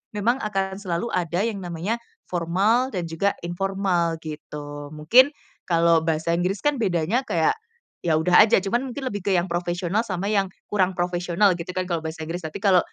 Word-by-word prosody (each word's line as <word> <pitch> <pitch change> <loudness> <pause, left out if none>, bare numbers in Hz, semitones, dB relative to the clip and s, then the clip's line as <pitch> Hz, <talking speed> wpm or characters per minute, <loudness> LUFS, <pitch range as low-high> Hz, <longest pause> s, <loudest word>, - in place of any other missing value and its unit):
memang 235 +6 +1
akan 195 -3 -2
selalu 190 +3 -3
ada 175 +1 0
yang 215 -3 -2
namanya 180 +6 -3 0.2
formal 190 +9 +1
dan 185 -8 -3
juga 165 +5 -1
informal 175 -1 0
gitu. 145 -1 -7
Mungkin 240 - +6 0.4
kalau 170 -1 +4
bahasa 160 +1 0
Inggris 180 +4 0
kan, 295 -3 +1
bedanya 190 +5 0
kayak, 435 - +2 0.5
ya 165 -2 +1
udah 180 +6 +6
aja 195 - +3
cuman 240 +7 0
mungkin 270 +2 -6
lebih 205 -1 -6
ke 190 - +3
yang 175 0 0
profesional, 175 +5 -1
sama 195 +2 -2
yang 195 -2 +2 0.2
kurang 190 -3 +2
profesional 175 +2 +2
gitu 180 +2 -6
kan, 185 - 0
kalau 175 -2 -2
bahasa 160 0 -6
Inggris. 170 +3 -4
Tapi 155 +6 -8
kalau 190 -3 +6
180 Hz, 175 wpm, -24 LUFS, 170-205 Hz, 0.5 s, Mungkin